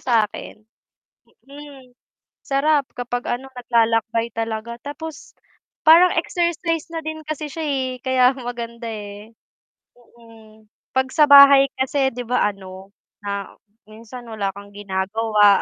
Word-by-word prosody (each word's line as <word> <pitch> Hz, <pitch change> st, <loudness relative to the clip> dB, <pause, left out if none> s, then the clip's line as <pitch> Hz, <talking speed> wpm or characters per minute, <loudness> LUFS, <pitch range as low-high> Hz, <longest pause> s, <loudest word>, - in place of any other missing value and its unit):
sa 230 Hz, -4 st, +2 dB
akin. 210 Hz, -, -10 dB, 0.9 s
Mm. 280 Hz, -3 st, -13 dB, 0.5 s
Sarap 280 Hz, 0 st, +1 dB
kapag 245 Hz, 0 st, -4 dB
ano 255 Hz, +2 st, -4 dB
naglalakbay 230 Hz, -1 st, 0 dB
talaga 225 Hz, +1 st, -4 dB
tapos 295 Hz, +1 st, -9 dB, 0.5 s
parang 340 Hz, +3 st, +7 dB
exercise 340 Hz, -1 st, -1 dB
na 325 Hz, -, -2 dB
din 315 Hz, 0 st, -5 dB
kasi 305 Hz, 0 st, -4 dB
siya 325 Hz, -, -5 dB
eh, 260 Hz, -2 st, -2 dB
kaya 260 Hz, 0 st, +3 dB
maganda 235 Hz, -2 st, -7 dB
eh. 210 Hz, 0 st, -9 dB, 0.7 s
Mm. 225 Hz, -2 st, -19 dB, 0.3 s
'Pag 260 Hz, 0 st, +1 dB
sa 305 Hz, -, +6 dB
bahay 280 Hz, -1 st, +9 dB, 0.2 s
kasi 265 Hz, 0 st, +1 dB
'di 245 Hz, -, -5 dB
ba 250 Hz, -, +2 dB
ano 190 Hz, 0 st, -12 dB, 0.3 s
na 200 Hz, -1 st, -4 dB, 0.4 s
minsan 230 Hz, +3 st, -11 dB
wala 210 Hz, -3 st, -3 dB
kang 200 Hz, 0 st, -12 dB
ginagawa 205 Hz, +1 st, +2 dB
245 Hz, 125 wpm, -21 LUFS, 220-280 Hz, 0.9 s, bahay